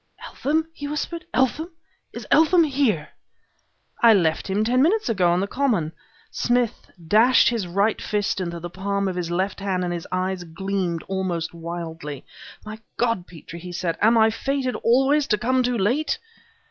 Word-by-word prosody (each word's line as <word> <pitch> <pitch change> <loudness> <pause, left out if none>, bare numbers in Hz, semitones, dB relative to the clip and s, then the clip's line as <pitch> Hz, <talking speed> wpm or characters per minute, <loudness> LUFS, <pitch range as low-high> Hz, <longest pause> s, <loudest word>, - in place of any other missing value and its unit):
"Eltham!" 315 +3 -1
he 290 -2 -6
whispered 310 +3 -4
"Eltham! 265 +8 +1 0.4
is - - -8
Eltham 330 +2 +5
here?" 265 - 0 0.9
"I 230 -2 +7
left 165 -1 +1
him 200 +3 +1
ten 250 +3 +2
minutes 410 - +2
ago 190 -6 +2
on 175 +1 +1
the - - 0
common 210 - 0 0.2
" - - -31
Smith 240 -2 0 0.2
dashed 230 +7 +5
his 230 -6 -2
right 200 +5 +1
fist 205 -2 -1
into 170 -1 -4
the 175 - -6
palm 200 +1 -2
of 185 - -2
his 175 -2 -3
left 185 +4 -1
hand 190 -2 -1
and 175 -1 -2
his 170 -1 -5
eyes 185 0 -2
gleamed 175 0 -3
almost 185 -4 -2
wildly. 165 -4 -6 0.4
"My 215 +1 -8 0.2
God, 230 -7 0
Petrie!" 170 0 -11
he 180 +1 -8
said, 170 -1 -2
"am 225 +2 +5
I 220 0 +5
fated 270 +2 -2
always 270 +5 +3
to 210 - +2
come 255 +4 +1
too 250 -1 0
late?" 245 +10 +1
200 Hz, 170 wpm, -23 LUFS, 175-250 Hz, 0.9 s, I